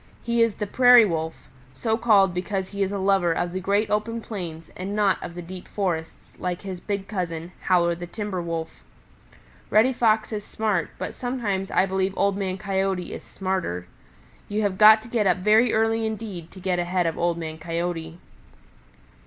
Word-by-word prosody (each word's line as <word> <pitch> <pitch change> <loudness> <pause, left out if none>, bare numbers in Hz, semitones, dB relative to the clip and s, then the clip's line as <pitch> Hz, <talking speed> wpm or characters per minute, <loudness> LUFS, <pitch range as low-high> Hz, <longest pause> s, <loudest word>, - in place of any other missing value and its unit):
He 235 -1 +1
is 230 -2 +3
the 210 - -3
Prairie 245 +2 +7
Wolf, 160 -3 -3 0.3
so 220 - 0
called 205 -5 +4
because 190 +1 -2
he 200 0 -5
is 195 0 +1
a 200 - -2
lover 190 -3 +2
of 175 +1 -2
the 185 - -2
great 200 +4 0
open 220 +2 0
plains 170 -8 -7
and 195 +3 -4
not 205 -2 +2
of 170 - -7
the 175 - -6
deep 180 +1 -9
forests 170 -5 -3
like 180 0 -3
his 190 -2 -5
big 200 0 -4
cousin, 175 -4 -4
Howler 175 -2 +2
the 175 +1 -7
Timber 205 -1 -4
Wolf. 165 -1 -5 0.9
Reddy 230 +5 +4
Fox 220 -2 +2
is 210 -1 -3
smart, 210 -7 -1
but - - -5
sometimes 220 -7 -2
I 190 - +3
believe 190 0 -1
Old 200 -1 +2
Man 190 -2 -2
Coyote 195 -2 -1
is - - -7
smarter. 185 - -3 0.6
You 210 +1 0
have 195 -2 -1
got 215 +1 +8
to - - -11
get 225 -4 +1
up 180 - +3
very 215 +6 +4
early 225 +1 +2
indeed 205 -6 -6
to 190 - -13
get 180 -1 -1
ahead 175 0 0
of 165 - 0
Old 170 0 0
Man 160 -1 -6
Coyote. 165 0 -3
190 Hz, 185 wpm, -24 LUFS, 175-215 Hz, 0.9 s, got